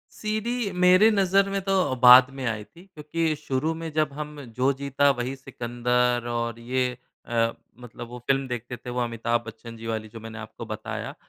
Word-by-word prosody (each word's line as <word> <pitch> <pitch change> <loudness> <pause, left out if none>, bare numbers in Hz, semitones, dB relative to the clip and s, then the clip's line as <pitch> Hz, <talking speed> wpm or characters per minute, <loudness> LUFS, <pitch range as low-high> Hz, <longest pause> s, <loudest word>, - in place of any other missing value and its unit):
CD 215 +1 -2
मेरे 185 +5 +7
नज़र 195 -1 +3
में 195 0 -1
तो, 190 -8 +1
बाद 125 +1 +9
में 135 -1 -7
आई 110 -2 -2
थी। 170 +10 -18
क्योंकि 155 +1 -1
शुरू 150 +2 -1
में 165 - -4
जब 155 -2 0
हम 150 0 -7 0.2
जो 130 +2 +3
जीता 140 0 +2
वही 125 0 -2
सिकंदर 120 -1 -1
और 115 -1 -2
ये 125 +1 0 0.4
अ, 115 -1 +1 0.3
मतलब 120 0 -9
वो 125 +1 -8
फ़िल्म 135 0 +2
देखते 125 0 -5
थे 125 - -9
वो 125 0 -2
अमिताभ 115 0 -1
बच्चन 115 +1 -9
जी 115 0 -9
वाली 110 -1 -3
जो 115 +1 -10
मैंने 115 +1 -8
आपको 110 +1 -8
बताया। 110 -1 -5
125 Hz, 185 wpm, -25 LUFS, 115-155 Hz, 0.4 s, बाद